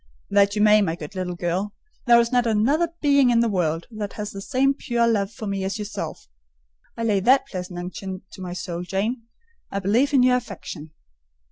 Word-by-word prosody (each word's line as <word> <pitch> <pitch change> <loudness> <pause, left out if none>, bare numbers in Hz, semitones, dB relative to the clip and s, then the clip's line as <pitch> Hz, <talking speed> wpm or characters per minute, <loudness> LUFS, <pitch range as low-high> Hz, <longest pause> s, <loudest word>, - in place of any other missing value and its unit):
"That 200 0 +4
you 210 - +2
may, 210 0 +6
my 165 -5 0
good 160 +2 -9
little 185 -2 -3
girl: 180 +4 -2 0.3
there 235 0 +7
is 235 0 +1
not 245 -2 +2
another 255 +10 +2
being 280 -3 +4
in 235 -1 +4
the 235 - +2
world 170 -5 -1 0.3
has 210 0 -5
the 195 - -7
same 275 +4 +2
pure 240 -4 0
love 205 -3 +1
for 225 -1 -8
me 195 -1 -2
as 195 +3 -2
yourself—for - - -10
I - - -1
lay 210 -3 +2
that 265 +7 +4
pleasant 180 -7 -6
unction 185 +1 -6
to 190 - -11
my 180 -1 -5
soul, 175 -1 -5
Jane, 215 +6 -2 0.4
a 200 - -1
belief 225 +9 +2
in 270 -3 +4
your 250 0 +5
affection." 165 -9 -8
205 Hz, 200 wpm, -23 LUFS, 180-235 Hz, 0.4 s, there